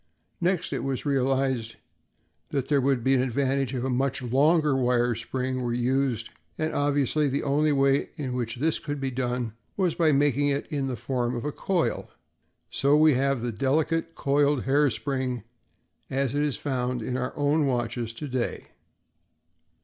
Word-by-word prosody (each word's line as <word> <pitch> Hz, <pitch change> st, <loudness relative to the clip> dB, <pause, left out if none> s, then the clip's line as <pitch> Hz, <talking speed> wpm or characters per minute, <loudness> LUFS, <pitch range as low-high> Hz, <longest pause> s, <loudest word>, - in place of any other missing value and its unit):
Next, 180 Hz, 0 st, 0 dB
it -, -, -2 dB
was 135 Hz, 0 st, -3 dB
realized 130 Hz, -4 st, 0 dB, 0.7 s
that 135 Hz, -2 st, -2 dB
there 145 Hz, -2 st, +3 dB
would 130 Hz, -2 st, +1 dB
be 135 Hz, -, +3 dB
an 130 Hz, -, +3 dB
advantage 135 Hz, +1 st, 0 dB
if 125 Hz, -, -2 dB
a 130 Hz, -, -1 dB
much 135 Hz, +1 st, 0 dB
longer 130 Hz, -3 st, +3 dB
spring 130 Hz, +3 st, -3 dB
were 120 Hz, -1 st, -1 dB
used, 125 Hz, -1 st, 0 dB, 0.3 s
and 155 Hz, 0 st, -1 dB
obviously 145 Hz, +1 st, +1 dB
the 140 Hz, +1 st, -1 dB
only 150 Hz, +2 st, +2 dB
way 140 Hz, 0 st, +2 dB
in 140 Hz, -6 st, -4 dB
which 120 Hz, -2 st, -2 dB
this 155 Hz, +5 st, 0 dB
could 145 Hz, -1 st, -4 dB
be 135 Hz, -1 st, -2 dB
done 125 Hz, -3 st, -2 dB, 0.2 s
was 185 Hz, -4 st, +2 dB
by 160 Hz, -2 st, +3 dB
making 145 Hz, 0 st, +2 dB
it 140 Hz, 0 st, 0 dB
in 140 Hz, -3 st, -1 dB
the 130 Hz, -, -2 dB
form 120 Hz, +1 st, -2 dB
of 120 Hz, -, -4 dB
a 150 Hz, -, -1 dB
coil, 180 Hz, +2 st, -1 dB
and -, -, -31 dB, 0.6 s
so 140 Hz, +2 st, +3 dB
we 155 Hz, 0 st, +6 dB
have 135 Hz, -1 st, +1 dB
the 120 Hz, -, -1 dB
delicate, 160 Hz, +7 st, 0 dB
coiled 140 Hz, -1 st, +2 dB
hair 145 Hz, +2 st, +3 dB
spring, 125 Hz, 0 st, -2 dB, 0.7 s
as 135 Hz, -1 st, 0 dB
it 145 Hz, -, +1 dB
is 150 Hz, -2 st, 0 dB
found 125 Hz, -3 st, -2 dB
in 125 Hz, -, -3 dB
our 130 Hz, +3 st, -3 dB
own 145 Hz, +1 st, +2 dB
watches 120 Hz, -2 st, -1 dB
to 145 Hz, +6 st, -6 dB
day. 130 Hz, -2 st, -3 dB
135 Hz, 170 wpm, -26 LUFS, 125-145 Hz, 0.7 s, we